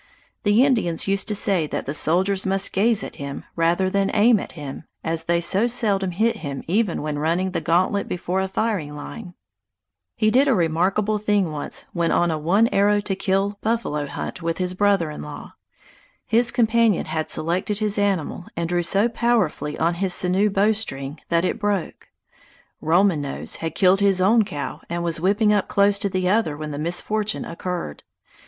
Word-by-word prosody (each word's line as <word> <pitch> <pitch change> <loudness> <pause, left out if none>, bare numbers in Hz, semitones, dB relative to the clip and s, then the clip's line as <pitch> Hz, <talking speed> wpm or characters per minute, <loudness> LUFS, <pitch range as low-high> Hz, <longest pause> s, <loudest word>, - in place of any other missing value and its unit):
The 210 +4 +4
Indians 215 - +1
used 195 0 0
to 210 - -1
say 190 -6 +1
that - - -4
the 140 - -3
soldiers 190 +6 +2
must 195 0 +1
gaze 215 +1 +2
at - - -8
him 140 0 -6
rather 170 +3 +1
than 195 +1 0
aim 220 +1 +5
at - - -8
him, 145 -1 -8 0.2
as 165 0 0
they 170 0 +2
so 190 +6 +1
seldom 210 -6 0
hit 220 +6 0
him 140 -7 -6
even 195 -1 0
when 150 -1 -3
running 170 +5 0
the - - -2
gantlet 185 +4 +1
before 180 +1 -2
a 190 - -1
firing 190 -7 -2
line. 180 +5 -9 0.8
He 215 -1 +2
did 265 +5 +4
a 265 - +3
remarkable 190 +5 +1
thing 205 -5 +1
once 150 -1 -4
when 170 -1 0
on 175 -1 +2
a 155 - -2
one 195 +9 +3
arrow 205 +1 +3
to 195 -1 -2
kill 195 +2 -1
buffalo 215 -11 -1
hunt 180 - -6
with 165 0 -2
his 180 -1 -2
brother 195 -4 +1
in - - -8
law. 75 - -9 0.7
His 235 +2 +3
companion 230 -4 +2
had 155 0 -3
selected 180 +6 0
his 210 -1 0
animal 190 -4 -1
and 170 0 -1
drew 175 +1 0
so 195 +6 +2
powerfully 230 -11 0
on 165 +2 +1
his 180 +1 0
sinew 190 +3 +2
bowstring 195 -9 -1
that 170 +1 +2
it 220 - -2
broke. 205 -4 -2 0.7
Roman 170 0 +2
Nose 140 -1 -4
had 165 -1 -4
killed 190 +1 +4
his 200 -2 +3
own 215 +4 +4
cow 150 -3 -6
and 170 0 -3
was 165 -2 -1
whipping 210 +3 +3
up 205 -2 +1
close 200 0 +3
to 200 - -1
the 185 -1 -1
other 190 -7 +1
when 155 0 -6
the 145 - -5
misfortune 210 +6 0
occurred. 170 - -5
190 Hz, 185 wpm, -22 LUFS, 165-210 Hz, 0.8 s, aim